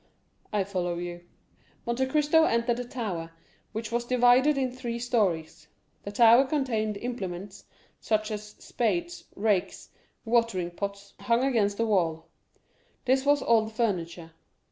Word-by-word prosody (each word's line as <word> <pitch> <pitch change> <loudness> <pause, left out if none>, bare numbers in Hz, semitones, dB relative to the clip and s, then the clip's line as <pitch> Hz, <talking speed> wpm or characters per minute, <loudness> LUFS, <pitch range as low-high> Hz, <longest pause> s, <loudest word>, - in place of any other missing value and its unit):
"I 205 -2 +1
follow 180 -3 -2
you." 175 0 -6 0.6
Monte 245 +2 0
Cristo 300 +3 +3
entered 235 -1 +1
the 245 - -4
tower, 195 -10 -4 0.4
which 220 +1 -5
was 235 0 0
divided 250 +4 +4
into 255 -2 -1
three 240 -2 -4
stories. 175 -10 -1 0.3
The 200 - -7
tower 235 +4 +6
contained 235 -7 -1
implements, 200 -5 -6 0.3
such 215 0 -1
as 210 0 -6
spades, 345 +9 -2
rakes, 200 -3 -1 0.4
watering 225 -7 +1
pots, 200 +2 -6
hung 235 +1 +1
against 215 -7 +1
the 230 - +1
wall; 165 -6 0 0.8
this 265 +2 +2
was 285 -1 +4
all 230 -1 +4
the - - -6
furniture. 175 -7 -2
225 Hz, 135 wpm, -27 LUFS, 195-245 Hz, 0.8 s, tower